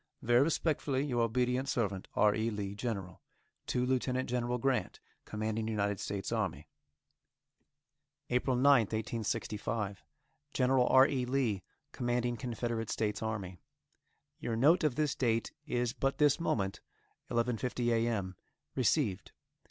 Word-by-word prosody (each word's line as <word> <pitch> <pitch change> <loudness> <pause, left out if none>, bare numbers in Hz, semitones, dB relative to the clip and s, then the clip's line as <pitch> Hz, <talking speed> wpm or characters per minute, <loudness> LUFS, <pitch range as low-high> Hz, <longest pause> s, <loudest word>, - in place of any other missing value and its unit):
Very 120 +2 +5
respectfully, 145 -3 +1
Your 125 -4 0
obedient 125 +3 +1
servant, 100 -5 -1
R. 105 0 +4
E. 110 +2 0
LEE, 100 -2 -4
General. 100 -5 -4 0.5
To 125 0 0
Lieutenant 130 0 0
General 125 0 -1
Grant, 130 +1 0 0.3
Commanding 110 +1 -2
United 100 -3 -1
States 100 -1 -4
Army. - - -2 1.6
APRIL 125 +1 +2
9th, 125 -5 +5
1865. 110 -3 -2 0.5
Gen. 130 0 +2
R. 130 +1 +6
E. 130 -3 -1
Lee, 125 -7 0 0.3
Commanding 120 0 -1
Confederate 115 -2 -3
States 105 -2 -1
Army: 100 -5 -4 0.8
Your 115 - -2
note 150 +10 +4
of 150 -5 +2
this 150 -1 +1
date 115 -3 0 0.2
is 120 -3 0
but 135 0 -1
this 150 0 +4
moment, 100 - -1 0.5
11.50 120 0 0
a. 115 0 +2
m., 100 -5 -2 0.4
received. 120 - 0
120 Hz, 125 wpm, -32 LUFS, 110-130 Hz, 1.6 s, R